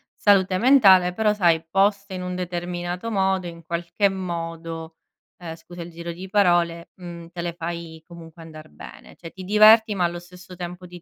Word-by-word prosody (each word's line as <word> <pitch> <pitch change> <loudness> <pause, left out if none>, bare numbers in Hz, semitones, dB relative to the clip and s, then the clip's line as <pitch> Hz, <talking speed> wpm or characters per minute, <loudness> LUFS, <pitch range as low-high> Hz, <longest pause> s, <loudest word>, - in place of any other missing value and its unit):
salute 190 -2 +3
mentale, 195 -8 +5
però 215 +2 +1
sai, 170 -5 +2
poste 200 +2 +1
in 185 - -5
un 180 0 -5
determinato 175 +2 -4
modo 190 -3 0
in 170 -1 -11
qualche 170 +4 -1
modo 165 -3 -6 0.4
ehm, 165 -2 -7
scusa 175 +1 -12
il 170 - -8
giro 170 +1 -7
di 185 +3 -10
parole, 175 -4 +1
mhmm, 170 -2 -10
te 175 - -5
le 170 -1 -4
fai 170 -1 -7
comunque 165 -1 -13
andar 155 -1 -12
bene, - - -13
cioè 165 -1 -12
ti 190 - -10
diverti, 215 +2 +5
ma 185 - 0
allo 175 0 -3
stesso 180 +1 -14
tempo 180 +1 -8
ti 175 0 -12
175 Hz, 180 wpm, -23 LUFS, 170-190 Hz, 0.4 s, mentale